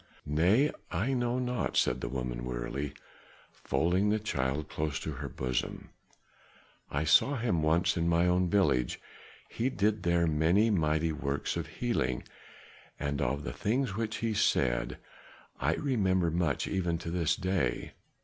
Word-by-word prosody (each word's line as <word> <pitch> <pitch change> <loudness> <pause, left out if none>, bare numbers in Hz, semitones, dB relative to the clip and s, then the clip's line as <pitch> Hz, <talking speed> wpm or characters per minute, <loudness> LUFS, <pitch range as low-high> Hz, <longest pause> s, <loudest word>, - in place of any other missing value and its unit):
"Nay, 90 - +3 0.2
I 100 +10 0
know 120 -1 0
not," 125 -1 -1
said 60 0 +2
the - - -3
woman 60 -2 -4
wearily, 65 +4 -4 0.6
folding 90 +5 +1
the 105 - +3
child 70 -8 -2
close 75 -3 -2
to 80 - -3
her 70 0 -5
bosom. 65 0 -3 1.0
"I 70 +2 -1
saw 135 - +5
him 115 -9 0
once 80 +4 +2
in 85 -1 +1
my 85 +1 +3
own 90 0 +2
village. 85 -12 +2 0.5
He 120 +3 -1
did 105 -3 0
there 85 0 +2
many 85 +8 +3
mighty 80 -3 +1
works 70 -2 -2
of 85 -2 -3
healing, 80 - -1 0.8
and 70 -1 -2
of 70 +4 -1
the - - -4
things 115 - -1
which 110 0 -2
he 115 - 0
said, 60 - +1 0.6
I 75 +5 +1
remember 95 - +1
much 80 -4 0
even 85 -3 0
to 85 - -6
this 85 -2 +1
day. 95 -10 -1
85 Hz, 150 wpm, -30 LUFS, 70-100 Hz, 1.0 s, saw